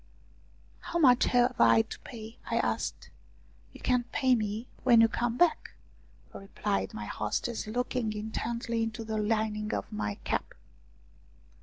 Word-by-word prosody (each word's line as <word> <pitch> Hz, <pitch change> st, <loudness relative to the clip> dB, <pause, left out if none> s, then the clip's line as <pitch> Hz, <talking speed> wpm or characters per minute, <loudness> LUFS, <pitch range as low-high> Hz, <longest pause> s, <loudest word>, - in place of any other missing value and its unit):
" -, -, -30 dB
How 345 Hz, -, 0 dB
much 255 Hz, -7 st, +5 dB
have 245 Hz, 0 st, +3 dB
I 225 Hz, -, +6 dB
to 225 Hz, -, -9 dB
pay? 225 Hz, -2 st, -10 dB
" -, -, -25 dB
I -, -, +1 dB
asked. -, -, -2 dB, 0.3 s
" -, -, -30 dB
You -, -, -13 dB
can 250 Hz, -1 st, +1 dB
pay 255 Hz, +1 st, +2 dB
me 215 Hz, 0 st, -1 dB, 0.2 s
when 240 Hz, -3 st, +6 dB
you 225 Hz, -, +7 dB
come 240 Hz, +1 st, -1 dB
back," 350 Hz, +1 st, +2 dB, 0.6 s
replied 100 Hz, -, -3 dB
my 105 Hz, -1 st, -5 dB
hostess, 215 Hz, -, -3 dB
looking 245 Hz, 0 st, -1 dB
intently 230 Hz, +2 st, -3 dB
into 225 Hz, 0 st, -3 dB
the 220 Hz, -1 st, -3 dB
lining 215 Hz, 0 st, 0 dB
of 100 Hz, -, -5 dB
my 105 Hz, -1 st, -3 dB
cap. -, -, -2 dB
225 Hz, 155 wpm, -29 LUFS, 210-245 Hz, 0.6 s, you